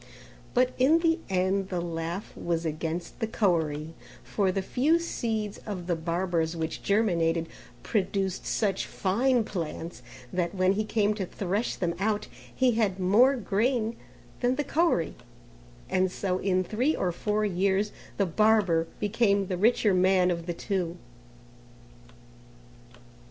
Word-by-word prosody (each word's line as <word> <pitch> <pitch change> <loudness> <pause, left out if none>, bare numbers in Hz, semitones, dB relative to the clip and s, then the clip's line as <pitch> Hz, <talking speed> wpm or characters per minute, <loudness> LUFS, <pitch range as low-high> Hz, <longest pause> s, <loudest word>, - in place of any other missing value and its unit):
But 255 +1 +3
in 280 +6 +5
the 330 0 +2
end 190 +1 +1
the 180 - -2
laugh 170 +2 -4
was 170 -1 -2
against 160 +2 -4
the 225 - -1
Koeri, 160 -7 0 0.3
for 195 -3 0
the 190 +1 -2
few 280 - +2
seeds 220 -11 -3
of 190 -5 -6
the 175 -1 0
barber's 170 0 -1
which 160 -1 -3
germinated, 170 -6 +1 0.4
produced 195 -2 -1
such 200 -4 0
fine 240 +6 +1
plants 170 -3 -5 0.3
that 180 +1 -1
when 185 0 +3
he 215 +2 -1
came 210 -1 +1
to 205 -3 -3
thresh 200 +5 -2
them 175 -2 -1
out 210 +1 0 0.2
he 260 -1 +2
had 210 -5 0
more 220 +9 +5
grain 230 +1 0 0.4
than 250 +1 +2
the 295 - -1
Koeri, 305 - +1 0.7
and 185 0 +1
so 185 -1 -1
in 185 -1 +1
3 245 - 0
or 180 - 0
4 210 +4 -1
years 195 +2 +1 0.3
the 200 - +2
barber 190 -3 +3
became 205 -2 +2
the 185 - -2
richer 210 +1 +3
man 185 0 +4
of 170 0 -4
the 175 - -1
two. 180 -2 -2
195 Hz, 140 wpm, -28 LUFS, 175-220 Hz, 0.7 s, in